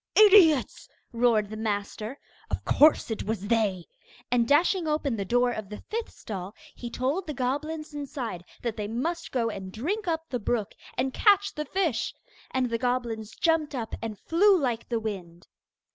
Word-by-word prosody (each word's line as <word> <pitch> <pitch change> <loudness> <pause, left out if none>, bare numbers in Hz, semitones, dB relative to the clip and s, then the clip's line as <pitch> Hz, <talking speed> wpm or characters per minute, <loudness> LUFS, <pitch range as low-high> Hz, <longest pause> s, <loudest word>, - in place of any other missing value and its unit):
'Idiots!' 385 - +6 0.2
roared 230 -3 +2
the - - -4
master; 215 +3 -3 0.3
'of - - -3
course 300 -5 +5
it 220 - -2
was 205 -1 -3
they!' 205 -7 +1 0.5
And 240 -2 +3
dashing 335 +4 +3
open 300 -5 0
the 200 - -2
door 245 +4 +2
of 215 -4 -5
the 210 - -6
fifth 455 +1 -2
stall, 195 -1 -7 0.2
he 240 - -7
told 275 +10 -1
the 300 - -4
goblins 300 +5 -2
inside 275 - -5 0.2
that 235 -2 -2
they 210 -1 -3
must 325 +10 -3
go 230 -3 0
and 190 -2 -7
drink 360 - -3
up 325 -1 -1
the 250 - -3
brook, 215 -1 -1 0.2
and 260 +1 0
catch 405 -2 +4
the 300 - -4
fish. 325 - -1 0.3
And 255 -2 0
the 230 - 0
goblins 235 -3 -2
jumped 320 -3 +1
up, 230 -3 -4
and 220 -2 -4
flew 385 - +4
like 245 -5 -2
the 235 -2 0
wind. 185 -6 -6
245 Hz, 175 wpm, -27 LUFS, 220-310 Hz, 0.5 s, Idiots